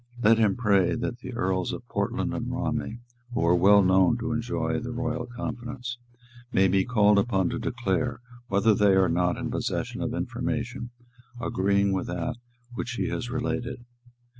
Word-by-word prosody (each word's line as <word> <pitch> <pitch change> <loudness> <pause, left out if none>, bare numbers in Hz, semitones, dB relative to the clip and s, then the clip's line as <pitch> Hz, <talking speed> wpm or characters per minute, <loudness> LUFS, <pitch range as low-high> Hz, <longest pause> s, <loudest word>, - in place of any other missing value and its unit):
Let 115 +1 +6
him 105 -4 +3
pray 100 -6 +3
that 120 0 -3
the 125 0 -7
Earls 95 -4 0
of - - -7
Portland - - -1
and - - -3
Romney, 115 - -2 0.4
who 85 - +1
are 85 - +5
well 100 +3 +6
known 95 +4 +4
to 120 0 -3
enjoy 115 +1 -1
the 120 +1 -5
royal 125 0 -3
confidence, 120 +1 -6 0.5
may 95 -3 +4
be 95 +1 +3
called 105 -4 +4
upon 95 -4 +1
to - - -3
declare 120 0 -1 0.3
whether 100 +2 +3
they 100 -1 +4
are 95 -1 +4
not 90 +1 +1
in - - -3
possession - - -2
of - - -2
information 120 0 -3 0.5
agreeing 100 -2 +1
with 95 - -2
what 120 +7 -6
he - - -1
has 120 - -3
related. 125 -1 -3
115 Hz, 165 wpm, -26 LUFS, 95-120 Hz, 0.5 s, Let